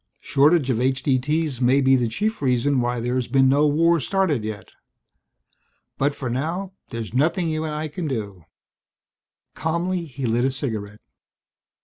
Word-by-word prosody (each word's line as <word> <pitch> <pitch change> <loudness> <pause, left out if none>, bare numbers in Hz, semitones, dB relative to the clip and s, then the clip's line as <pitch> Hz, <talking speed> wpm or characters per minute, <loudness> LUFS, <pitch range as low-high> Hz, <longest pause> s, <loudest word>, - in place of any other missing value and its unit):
Shortage 145 -1 +3
of 120 -1 0
H.D.T.'s 135 +2 0
may 130 +3 +4
be 135 -1 +4
the 120 -2 +1
chief 215 - -2
reason 130 0 +2
why 120 0 -1
there's 125 +1 -1
been 135 +1 +4
no 145 +3 +4
war 165 +3 +3
started 160 - 0
yet. 105 -1 -6 1.3
But 140 +1 +1
for 135 - -5
now 165 +10 -3 0.2
there's 115 -3 -6
nothing 160 +5 +1
you 155 0 -2
and 155 - -3
I 155 +1 -3
can 155 +2 -5
do." 100 - -5 1.1
Calmly 170 +2 -2
he 135 -3 -6
lit 120 +1 +1
a 135 - +3
cigarette. 110 -6 -5
135 Hz, 150 wpm, -23 LUFS, 120-155 Hz, 1.3 s, may